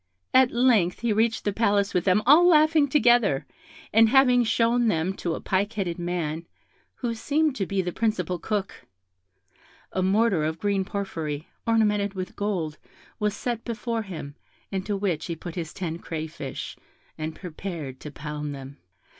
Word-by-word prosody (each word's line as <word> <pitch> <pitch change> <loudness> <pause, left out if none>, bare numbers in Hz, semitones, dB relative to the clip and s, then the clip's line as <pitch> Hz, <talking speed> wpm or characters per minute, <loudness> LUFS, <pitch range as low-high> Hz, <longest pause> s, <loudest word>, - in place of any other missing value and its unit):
At 260 -1 +6
length 235 -8 +2
he 235 -2 +1
reached 225 +1 +1
the 205 - +1
Palace 200 -2 +2
with 180 - +1
them 200 +2 +3
all 310 +7 +7
laughing 310 -2 +5
together, 240 - +3 0.5
and 225 +1 +6
having 250 -1 +5
shown 235 +1 +2
them 175 -1 +1
to 170 -2 -2
a - - -5
pike 200 +3 0
headed 185 -5 -3
man, 170 -2 -3 0.5
who 240 -2 -2
seemed 295 +5 0
to 195 - -1
be 195 -1 0
the 180 - -2
principal 180 -5 -1
cook, 200 -1 -3 1.0
a 190 - -1
mortar 195 -2 +2
of 160 +1 -1
green 200 +1 0
porphyry, 165 -7 -4 0.2
ornamented 210 -3 +2
with 185 -1 -5
gold, 180 -7 -2 0.4
was 210 -1 0
set 235 -2 -3
before 230 0 -3
him, 160 -8 -7 0.4
into 195 +1 -2
which 190 -6 -1
he 170 - -3
put 170 +1 -8
his 165 -3 -5
ten 170 -2 -4
crayfish, 155 -4 -6 0.4
and 155 0 -5
prepared 165 -7 -6
to 150 - -8
pound 150 0 -5
them. 135 +1 -10
195 Hz, 160 wpm, -26 LUFS, 165-230 Hz, 1.0 s, all